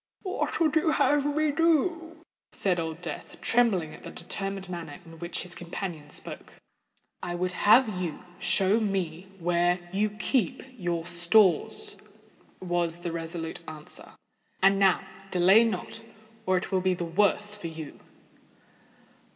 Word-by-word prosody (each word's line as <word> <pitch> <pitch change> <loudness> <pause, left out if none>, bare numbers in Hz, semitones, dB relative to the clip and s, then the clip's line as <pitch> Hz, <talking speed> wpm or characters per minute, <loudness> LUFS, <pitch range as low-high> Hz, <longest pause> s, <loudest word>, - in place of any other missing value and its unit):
"What 370 - -2
would 315 -2 +2
you 315 +1 +3
have 290 0 +3
me 310 -1 +2
do?" 330 +1 +1 0.3
said 180 -3 0
Old 165 +1 -4
Death, - - -7
trembling 200 -10 +2
at - - -12
the - - -8
determined 195 -1 -5
manner 170 -5 -6
in 165 -1 -13
which 170 +1 -3
his 180 0 -8
companion 170 -3 -6
spoke. - - -6 0.7
"I 175 - -3
would 180 +1 -1
have 210 0 +4
you 170 -1 -4 0.2
show 195 +3 +4
me 190 -4 -2
where 175 0 +2 0.2
you 210 +2 +2
keep 215 0 0
your 175 -6 -2
stores," 175 +1 +2 0.6
was 175 -2 -1
the 175 - -3
resolute 165 0 -4
answer. 155 -1 -9 0.5
"And 195 +1 +4
now—delay 195 +2 +3
not—or 220 0 -4
it 180 - -4
will 190 -1 +2
be 185 0 +2
the 175 - -3
worse 205 +4 +2
for 205 -5 -6
you." 160 -2 -8
185 Hz, 135 wpm, -28 LUFS, 170-220 Hz, 0.7 s, have